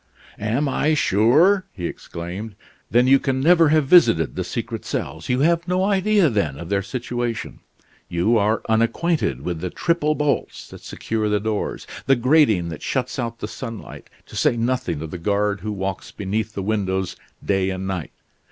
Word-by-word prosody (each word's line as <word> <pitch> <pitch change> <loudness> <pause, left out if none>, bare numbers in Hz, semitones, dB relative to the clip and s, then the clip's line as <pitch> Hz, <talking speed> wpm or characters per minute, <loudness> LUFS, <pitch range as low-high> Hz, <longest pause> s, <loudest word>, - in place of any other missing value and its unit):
"Am 115 +8 0
I 150 +3 +1
sure?" 155 - +4
he 90 -4 -5
exclaimed. 90 +6 -6 0.3
"Then 120 +2 +4
you 135 +1 +6
can 130 -1 -1
never 165 +2 +5
have 155 -1 +3
visited 130 - +5
the - - -2
secret - - -5
cells. 80 +4 -4
You 125 +1 +1
have 170 +3 +2
no 180 +1 +1
idea, 200 -1 +3
then, 100 - -1
of 85 +2 -8
their 100 -1 +1
situation; 120 +2 -4 0.5
you 90 +7 +2
are 110 +1 +1
unacquainted 115 - +1
with 85 -2 -2
the 90 - -2
triple 155 - 0
bolts 150 -1 -1
that - - -12
secure 110 -1 -3
the 105 0 +2
doors; 105 0 -3 0.2
the 135 - +5
grating 120 - +3
that 80 - -7
shuts 130 -1 -2
out 115 -2 -4
the - - -3
sunlight, 115 -4 -8 0.2
to - - -13
say 120 - +2
nothing 120 - -1
of 80 - -7
the 90 - -6
guard 100 +2 0
who 105 +3 -4
walks 95 -2 -4
beneath 105 +2 -3
the 100 - -3
windows 95 -3 -1 0.3
day 95 -1 +1
and 95 0 -4
night. 95 -4 -3
110 Hz, 175 wpm, -22 LUFS, 95-140 Hz, 0.5 s, you